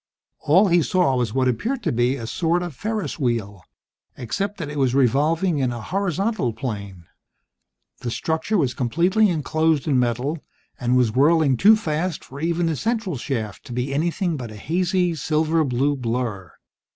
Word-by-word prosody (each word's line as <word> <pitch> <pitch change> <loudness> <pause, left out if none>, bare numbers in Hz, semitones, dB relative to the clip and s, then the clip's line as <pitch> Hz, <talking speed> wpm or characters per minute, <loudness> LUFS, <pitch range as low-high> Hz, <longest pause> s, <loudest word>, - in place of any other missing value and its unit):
All 185 +8 +4
he 175 0 +4
saw 175 -5 +2
was 120 -4 0
what 130 +2 +1
appeared 235 - -1
to - - 0
be 120 +3 +1
a 120 -5 -6
sort 170 +8 0
of 175 -6 -6
ferris 215 - -3
wheel, 110 -7 -2 0.6
except 195 - -3
that 165 - -4
it 150 - -4
was 130 -2 +2
revolving 150 +6 +2
in 130 -2 +1
a 120 - -5
horizontal 195 - -1
plane. 100 -7 -6 0.9
The 120 - -4
structure 160 - -1
was 135 -8 +1
completely 175 - +2
enclosed 160 -2 0
in 135 -4 +3
metal, 125 +6 -1 0.4
and 125 0 +1
was 125 -3 +3
whirling 145 +2 +3
too 210 - +6
fast 165 -3 -2
for 135 - -10
even 170 +2 0
the 165 -1 0
central 220 - -2
shaft 115 -6 -4
to 120 - -8
be 125 +3 -2
anything 170 +3 0
but 120 -4 -6
a 110 - -10
hazy, 175 - 0
silver 160 +1 +1
blue 140 +2 +1
blur. 115 - -3
145 Hz, 170 wpm, -22 LUFS, 125-175 Hz, 0.9 s, too